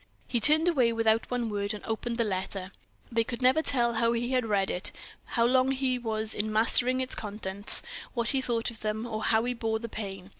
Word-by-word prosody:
He 240 - -1
turned 305 +8 +5
away, 260 -9 +3
without 225 0 +1
one 245 -2 -2
word, 205 0 -3
and 210 - -10
opened 230 +1 -3
the 235 - +1
letter. 190 -1 -4 0.4
They 230 0 +1
could 235 +1 -6
never 260 +5 +4
tell 240 -6 +1
how 230 +1 +1
he 240 +2 -2
had 255 -3 0
read 200 -2 0
it, 180 - -1 0.3
how 230 -1 0
long 255 +2 +3
he 260 -1 -1
was 220 -2 -3
in 215 +1 -2
mastering 240 +4 +3
its 260 - -3
contents, 205 -1 +4 0.3
what 235 -1 0
he 270 - 0
thought 235 -2 -2
of 225 - -13
them, 215 +1 -3
or 220 -2 -5
how 220 0 +3
he 245 +1 -1
bore 225 -2 -2
the 230 +1 -7
pain. 195 -3 -6
230 Hz, 220 wpm, -28 LUFS, 215-245 Hz, 0.4 s, turned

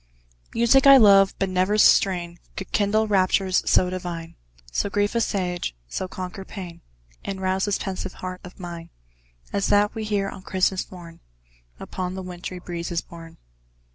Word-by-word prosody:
Music 245 +4 +5
I 275 0 +10
love 195 -4 +6
but 195 - 0
never 185 +3 +1
strain 175 -4 +3 0.2
Could 195 - -7
kindle 215 +1 +2
raptures 190 -1 +2
so 180 - +4
divine, 170 -2 -5 0.4
So 200 - -1
grief 205 +2 0
assuage, 180 - -1
so 185 - -4
conquer 185 +1 -7
pain, 180 -4 -9 0.4
And 195 -1 -5
rouse 190 0 0
this 205 -1 0
pensive 190 -1 -5
heart 185 0 -7
of 180 +2 -12
mine 170 -2 -8 0.6
As 200 -1 0
that 205 0 +3
we 220 -2 -4
hear 205 -2 -1
on 190 - -8
Christmas 185 0 0
morn, 170 -2 -11 0.6
Upon 185 0 -5
the 190 - -5
wintry 180 0 -7
breezes 170 -1 -4
borne. 165 -1 -12
185 Hz, 155 wpm, -24 LUFS, 175-200 Hz, 0.6 s, I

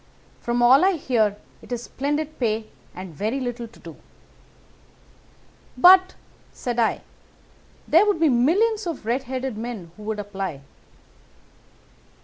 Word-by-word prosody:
From 240 0 -1
all 260 +7 +6
I 385 +1 +4
hear 225 - 0 0.2
it - - -16
is 240 -1 -3
splendid 295 +4 -3
pay 220 -3 0 0.3
and 185 -2 -8
very 215 - -2
little 245 -2 -4
to 230 - -19
do.' - - -11 1.8
"'But,' 370 +5 +7 0.4
said 240 -1 -4
I, 225 - +1 0.9
'there 350 +7 +5
would 410 -5 +1
be 325 -2 +4
millions 380 - +2
of 330 -10 -5
red 250 +4 -1
headed 260 -3 -4
men 220 -8 -6
who - - -12
would 215 0 -4
apply. 195 -7 -5
245 Hz, 130 wpm, -23 LUFS, 220-305 Hz, 1.8 s, But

